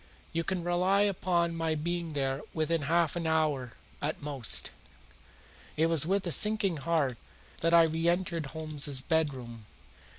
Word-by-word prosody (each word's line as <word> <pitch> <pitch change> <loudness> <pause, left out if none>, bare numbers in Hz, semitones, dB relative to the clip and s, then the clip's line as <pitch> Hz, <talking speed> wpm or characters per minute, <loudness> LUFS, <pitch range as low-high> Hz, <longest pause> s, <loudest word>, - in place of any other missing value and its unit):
You 165 +1 0
can 180 +1 -2
rely 180 +3 +2
upon 175 -4 +1
my 165 -1 0
being 170 +1 -3
there 135 -1 -1
within 160 0 +1
half 170 -1 +2
an 170 -1 -2
hour 150 -6 0 0.3
at 150 +2 -2
most." 140 -5 -1 1.1
It 160 +2 +3
was 160 -2 +3
with 195 +1 +1
a 170 - -2
sinking 210 -3 +3
heart 140 -4 0 0.4
that 165 +1 +3
I 170 - +8
reentered 165 0 0
Holmes's 145 -2 -2
bedroom. 130 -9 -2
160 Hz, 140 wpm, -30 LUFS, 145-170 Hz, 1.1 s, I